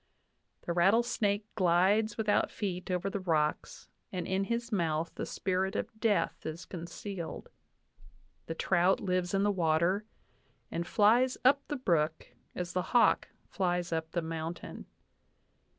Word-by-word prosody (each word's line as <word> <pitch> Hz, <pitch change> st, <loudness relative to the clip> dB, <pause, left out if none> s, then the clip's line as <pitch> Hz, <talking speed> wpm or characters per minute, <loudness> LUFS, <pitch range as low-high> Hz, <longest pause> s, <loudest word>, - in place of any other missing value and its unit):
The 170 Hz, -, -2 dB
rattlesnake 205 Hz, +2 st, +2 dB
glides 195 Hz, +4 st, +3 dB
without 215 Hz, -2 st, +2 dB
feet 185 Hz, -4 st, -4 dB
over 180 Hz, +1 st, -1 dB
the 195 Hz, +1 st, -2 dB
rocks, 155 Hz, -5 st, -1 dB, 0.2 s
and 180 Hz, -2 st, -3 dB
in 190 Hz, +1 st, 0 dB
his 235 Hz, +2 st, -2 dB
mouth 165 Hz, -4 st, 0 dB
the -, -, -5 dB
spirit 190 Hz, +1 st, -1 dB
of -, -, -3 dB
death 215 Hz, -2 st, +1 dB
is 160 Hz, +2 st, -6 dB
con 170 Hz, -2 st, -7 dB
cealed. 175 Hz, -2 st, -6 dB, 1.0 s
The 165 Hz, -, -4 dB
trout 180 Hz, +2 st, +2 dB
lives 180 Hz, 0 st, -1 dB
in 195 Hz, -, +2 dB
the 205 Hz, -, +3 dB
water, 175 Hz, +3 st, +1 dB, 0.7 s
and 170 Hz, 0 st, -3 dB
flies 235 Hz, +4 st, +4 dB
up 275 Hz, +2 st, +6 dB
the 295 Hz, -, -2 dB
brook 165 Hz, -9 st, 0 dB, 0.3 s
as 175 Hz, -1 st, -4 dB
the 185 Hz, -, +1 dB, 0.2 s
hawk -, -, +4 dB, 0.2 s
flies 180 Hz, -2 st, -1 dB
up 160 Hz, 0 st, -2 dB
the 170 Hz, 0 st, -2 dB
mountain. 165 Hz, +1 st, -6 dB
185 Hz, 140 wpm, -31 LUFS, 170-205 Hz, 1.0 s, up